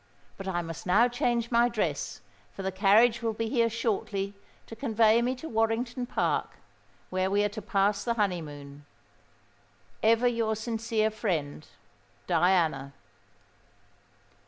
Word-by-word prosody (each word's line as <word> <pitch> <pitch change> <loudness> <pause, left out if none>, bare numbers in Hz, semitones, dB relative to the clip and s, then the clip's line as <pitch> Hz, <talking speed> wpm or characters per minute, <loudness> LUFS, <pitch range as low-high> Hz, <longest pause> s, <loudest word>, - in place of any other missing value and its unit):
But 195 - -8
I 175 -2 -1
must 165 +2 -8
now 215 +7 +5
change 240 -1 -1
my 235 +1 +4
dress; 230 -3 -2 0.3
for 195 - -7
the 190 - -1
carriage 215 +5 +4
will 225 -1 -1
be 225 +1 -3
here 230 -2 +2
shortly 205 -3 -2 0.3
to 225 - -10
convey 225 -2 +3
me 250 +2 0
to 290 +6 -8
Warrington 235 +1 -1
Park, - - -1 0.6
where 185 0 0
we 205 +1 +2
are 210 - +1
to 215 +1 -7
pass 200 0 +1
the 235 -1 -1
honeymoon. 145 -8 -3 1.2
"Ever 230 +2 +4
your 230 -2 0
sincere 220 0 -1
friend, 155 -9 -3 0.6
"DIANA." 165 -6 +1
215 Hz, 135 wpm, -28 LUFS, 190-230 Hz, 1.2 s, now